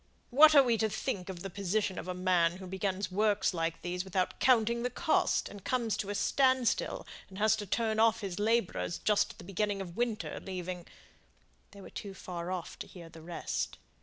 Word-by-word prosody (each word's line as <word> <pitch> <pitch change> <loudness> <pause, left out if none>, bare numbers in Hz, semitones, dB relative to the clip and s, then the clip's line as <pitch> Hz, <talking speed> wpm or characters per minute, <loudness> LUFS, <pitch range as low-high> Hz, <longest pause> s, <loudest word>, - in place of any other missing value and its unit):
What 305 +4 +8
are 280 - +9
we 235 -3 +1
to 220 - +2
think 195 -4 -3
of 180 -2 -6
the 195 - -4
position 200 +1 -1
of - - -7
a 180 - -3
man 180 -2 +2
who 190 - -9
begins 190 +1 -2
works 205 0 +2
like 165 -1 -2
these 180 +1 -2
without 185 -1 -1
counting 235 -2 +3
the 250 - 0
cost, 315 +4 +1
and 205 -2 -10
comes 235 -5 0
to 200 - -3
a 205 - -2
stand 260 +1 +3
still, - - -1 0.2
and 190 - -11
has 215 +1 +4
to 205 -1 -5
turn 220 +2 0
off 225 0 +4
his 195 -2 -4
labourers 215 -5 +1
just 210 -1 +1
at - - -24
the - - -11
beginning 200 +2 -1
of 175 -3 -6
winter, 235 -2 -2
leaving 180 -2 -6 0.4
" - - -37
They 200 - -13
were - - -11
too 200 -2 -7
far 175 -2 -6
off 180 -3 -5
to - - -6
hear 170 -3 -11
the 165 - -13
rest. 170 +1 -3
200 Hz, 215 wpm, -31 LUFS, 180-220 Hz, 0.4 s, are